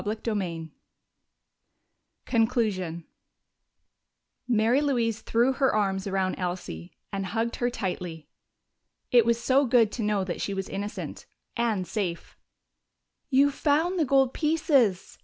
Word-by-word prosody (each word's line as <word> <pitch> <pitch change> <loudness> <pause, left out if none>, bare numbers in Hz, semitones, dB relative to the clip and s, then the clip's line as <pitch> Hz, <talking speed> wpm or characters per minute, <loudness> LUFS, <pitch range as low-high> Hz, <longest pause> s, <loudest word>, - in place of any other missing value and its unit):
CHAPTER 220 +2 -2
XIX 170 -5 -3 1.6
Conclusion 215 -8 0 1.4
Mary 235 +3 +3
Louise 235 -6 0
threw 240 +4 +2
her 265 0 +2
arms 195 -2 0
around 190 -1 -1
Elsie 175 - -5 0.2
and 195 0 -2
hugged 225 +4 -2
her 245 - +1
tightly. 180 -7 -5 0.8
It 240 -2 +5
was 235 0 +2
so 260 +4 +3
good 230 -3 +4
to 240 - -4
know 210 -2 +1
that 180 -2 -4
she 200 - -2
was 195 0 -3
innocent 205 +1 -6 0.3
and 225 -6 0
safe! 180 -3 -4 0.9
"You've 280 +1 +4
found 320 +6 +1
the 315 - +3
gold 270 -1 +3
pieces!" 290 - +1
220 Hz, 120 wpm, -27 LUFS, 190-250 Hz, 1.6 s, It